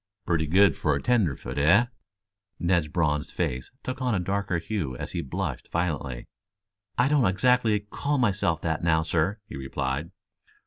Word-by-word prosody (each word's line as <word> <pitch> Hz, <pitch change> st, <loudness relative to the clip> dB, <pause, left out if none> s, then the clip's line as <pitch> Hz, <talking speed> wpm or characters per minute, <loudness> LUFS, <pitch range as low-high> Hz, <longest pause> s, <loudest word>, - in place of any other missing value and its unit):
"Pretty 80 Hz, -2 st, +1 dB
good 95 Hz, +2 st, +5 dB
for 75 Hz, -2 st, +1 dB
a -, -, -1 dB
tenderfoot, 75 Hz, -, 0 dB
eh?" 90 Hz, +11 st, +5 dB, 0.7 s
Ned's 85 Hz, -3 st, +1 dB
bronzed 75 Hz, -2 st, 0 dB
face 65 Hz, 0 st, -2 dB
took 130 Hz, +1 st, -4 dB
on 125 Hz, -4 st, +1 dB
a -, -, +1 dB
darker 95 Hz, 0 st, -1 dB
hue 85 Hz, -, -3 dB
as -, -, -5 dB
he -, -, -2 dB
blushed 65 Hz, -, -4 dB
violently. 75 Hz, -8 st, -2 dB, 0.7 s
"I 120 Hz, -, +4 dB
don't 145 Hz, -4 st, +3 dB
exactly 110 Hz, +2 st, +3 dB
call 140 Hz, +8 st, -2 dB
myself 95 Hz, -, +1 dB
that 80 Hz, 0 st, -1 dB
now, 80 Hz, -1 st, +3 dB
sir," 85 Hz, +5 st, 0 dB
he -, -, -9 dB
replied. 70 Hz, +3 st, -3 dB
85 Hz, 160 wpm, -26 LUFS, 75-105 Hz, 0.7 s, good